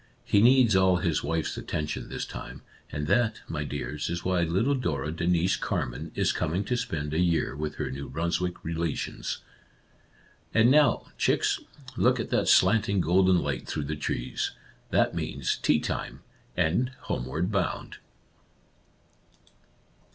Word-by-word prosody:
He 100 Hz, -, +3 dB
needs 120 Hz, -2 st, +6 dB
all 95 Hz, -1 st, +5 dB
his 85 Hz, -3 st, 0 dB
wife's 80 Hz, +2 st, -1 dB
attention 75 Hz, -1 st, -4 dB
this -, -, -4 dB
time, -, -, -8 dB, 0.3 s
and 75 Hz, 0 st, -3 dB
that, 115 Hz, +8 st, +1 dB
my 75 Hz, -2 st, -3 dB
dears, 70 Hz, +1 st, -4 dB
is 85 Hz, +1 st, -4 dB
why 90 Hz, -1 st, +2 dB
little 95 Hz, +12 st, +2 dB
Dora 80 Hz, -, -1 dB
Denise 85 Hz, +2 st, +1 dB
Carman -, -, -3 dB
is -, -, +2 dB
coming 85 Hz, +6 st, -1 dB
to 125 Hz, -, -1 dB
spend 80 Hz, -12 st, -3 dB
a 80 Hz, -, +1 dB
year 85 Hz, -5 st, +1 dB
with 75 Hz, +1 st, -4 dB
her -, -, -3 dB
New 70 Hz, +2 st, -6 dB
Brunswick 85 Hz, +4 st, -2 dB
relations. 85 Hz, -1 st, -3 dB, 0.5 s
" -, -, -32 dB
And 115 Hz, +2 st, +6 dB
now, 145 Hz, -5 st, +4 dB
chicks, -, -, +2 dB, 0.4 s
look 125 Hz, +1 st, +3 dB
at 115 Hz, -, -4 dB
that -, -, +2 dB
slanting, 100 Hz, +1 st, +4 dB
golden 90 Hz, +2 st, +4 dB
light 65 Hz, -3 st, -3 dB
through 75 Hz, -, -2 dB
the 75 Hz, +2 st, -3 dB
trees. 70 Hz, -4 st, -2 dB, 0.4 s
That -, -, +2 dB
means 70 Hz, -2 st, -2 dB
tea -, -, +3 dB
time, -, -, -4 dB, 0.4 s
and 90 Hz, +9 st, +2 dB
homeward 80 Hz, -, -2 dB
bound 95 Hz, -4 st, -2 dB
85 Hz, 145 wpm, -27 LUFS, 75-100 Hz, 0.5 s, needs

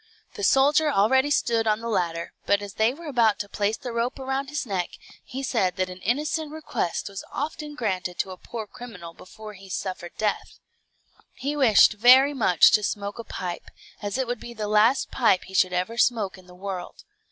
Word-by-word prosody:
The 415 Hz, -, -7 dB
soldier 295 Hz, 0 st, +4 dB
already 265 Hz, +6 st, +3 dB
stood 230 Hz, -5 st, +1 dB
on 215 Hz, 0 st, +2 dB
the 230 Hz, -, -6 dB
ladder; 170 Hz, -6 st, -2 dB
but 200 Hz, 0 st, +2 dB
as 200 Hz, -1 st, -8 dB
they 220 Hz, +3 st, +2 dB
were 330 Hz, +6 st, -11 dB
about 235 Hz, -7 st, +2 dB
to 205 Hz, -, -5 dB
place 205 Hz, +2 st, -1 dB
the 245 Hz, -, -6 dB
rope 235 Hz, +2 st, -2 dB
around 270 Hz, 0 st, -3 dB
his 295 Hz, -1 st, -3 dB
neck, 190 Hz, -5 st, -2 dB, 0.3 s
he 270 Hz, +2 st, -6 dB
said 205 Hz, -8 st, 0 dB
that 185 Hz, -1 st, -2 dB
an 180 Hz, -, -10 dB
innocent 300 Hz, -, -1 dB
request 290 Hz, -, -3 dB
was 195 Hz, -1 st, -7 dB
often 295 Hz, 0 st, -5 dB
granted 185 Hz, -8 st, -2 dB
to 190 Hz, -, -2 dB
a 185 Hz, -, -8 dB
poor 225 Hz, +2 st, -7 dB
criminal 200 Hz, -7 st, -10 dB
before 215 Hz, +5 st, -11 dB
he 195 Hz, -1 st, -14 dB
suffered 180 Hz, -2 st, -5 dB
death. 215 Hz, -1 st, -2 dB, 0.8 s
He 280 Hz, +4 st, -3 dB
wished 250 Hz, -9 st, +6 dB
very 255 Hz, +6 st, +6 dB
much 215 Hz, -, +5 dB
to 210 Hz, -, +4 dB
smoke 205 Hz, +1 st, -3 dB
a -, -, -4 dB
pipe, 180 Hz, -5 st, -6 dB, 0.3 s
as 205 Hz, +2 st, -3 dB
it 265 Hz, -, 0 dB
would 245 Hz, -1 st, -3 dB
be 240 Hz, 0 st, -9 dB
the 215 Hz, -1 st, -3 dB
last 215 Hz, +5 st, +3 dB
pipe 230 Hz, -7 st, +3 dB
he 190 Hz, -, -13 dB
should 185 Hz, -1 st, +3 dB
ever 185 Hz, +6 st, -2 dB
smoke 215 Hz, -6 st, +2 dB
in 185 Hz, -1 st, -17 dB
the 180 Hz, -, -14 dB
world. 185 Hz, -1 st, -7 dB
220 Hz, 200 wpm, -25 LUFS, 190-265 Hz, 0.8 s, wished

